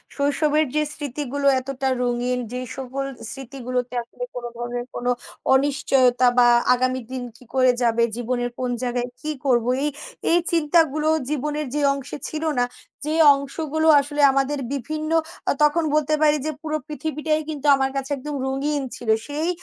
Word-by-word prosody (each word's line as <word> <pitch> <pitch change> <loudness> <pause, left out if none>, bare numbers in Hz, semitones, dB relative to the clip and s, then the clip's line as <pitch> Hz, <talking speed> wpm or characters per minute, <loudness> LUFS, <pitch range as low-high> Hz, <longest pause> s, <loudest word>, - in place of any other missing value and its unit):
শৈশবের 295 +2 +2
যে 305 - +3
স্মৃতিগুলো 285 -1 -3
এতটা 270 0 -3 0.2
রঙিন 245 +1 0
যে 250 - -3 0.2
সকল 265 +1 -4 0.3
স্মৃতিগুলোতে 255 -2 -4
আসলে - - -9
কোনো 240 -1 -4
ধরনের 240 0 -4
কোনো 245 0 0 0.4
অনিশ্চয়তা 265 -2 +3
বা 240 0 +7 0.3
আগামী 255 +1 0
দিন 255 -1 -4
কি - - -17
করে 255 -1 +5
যাবে? 235 -1 +2 0.2
জীবনের 245 0 -1
কোন 250 -1 -1
জায়গায় 245 0 -1
কি 310 0 -3
করব? 240 -3 +3 0.2
এই 295 - +2 0.5
এই - - +5
চিন্তাগুলো 310 -2 +2 0.2
জীবনের 300 +1 -2
যে 295 - +1
অংশে 275 0 -6
ছিল 310 +1 -4 0.2
না। 245 - +3 0.4
যে 310 +1 -1 0.2
অংশগুলো 310 +3 -2
আসলে 290 +1 -2
আমাদের 275 +1 0
বিভিন্ন 310 +4 -3 0.4
আ - - +5
তখন 320 +3 +3
বলতে 305 0 +1
পারি 300 -1 +5
যে 310 - 0
পুরো 310 -1 -2
পৃথিবীটাই 305 0 -2
কিন্তু 295 -1 -3
আমার 270 0 0
কাছে 270 +1 -3
একদম 290 +2 -5
রঙিন 280 +2 -1
ছিল। 230 - -6 0.2
সেই 305 +4 -2
275 Hz, 155 wpm, -23 LUFS, 250-300 Hz, 0.5 s, বা